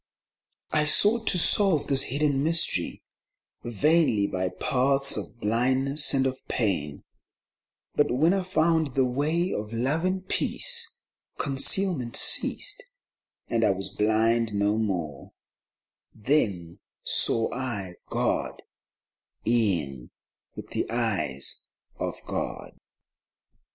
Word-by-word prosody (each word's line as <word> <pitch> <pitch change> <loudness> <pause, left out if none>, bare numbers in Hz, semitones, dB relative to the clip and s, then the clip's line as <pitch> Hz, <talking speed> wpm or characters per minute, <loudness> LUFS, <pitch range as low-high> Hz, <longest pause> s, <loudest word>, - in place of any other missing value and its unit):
I 150 -1 +1
sought 215 +9 +4
to - - +3
solve 180 -2 +4
this 135 -1 +1
hidden 140 +1 0
mystery 160 - 0 0.6
Vainly 120 -2 +1
by 95 -1 -2
paths 135 +8 0
of 120 - -7
blindness 130 +7 0
and 135 -1 +1
of 130 0 -2
pain, 80 - -2 0.9
But 145 - +1
when 155 +8 +2
I 195 - 0
found 160 -5 0
the 135 -1 +2
Way 155 +8 -1
of 105 +1 -5
Love 135 +8 -1
and 185 +1 -2
Peace, 470 - 0 0.4
Concealment 140 -2 +1
ceased, - - +3 0.7
and 115 -1 -1
I 105 - +3
was 95 0 -3
blind 110 +1 +1
no 100 +1 +1
more: 85 -10 -4 0.8
Then 105 - -1 0.2
saw 115 -1 +4
I 110 -8 -5
God - - -2 0.8
een 85 - -1 0.5
with - - -10
the - - -3
eyes 110 - -2 0.4
of - - -3
God. - - -5
125 Hz, 110 wpm, -25 LUFS, 105-155 Hz, 0.9 s, sought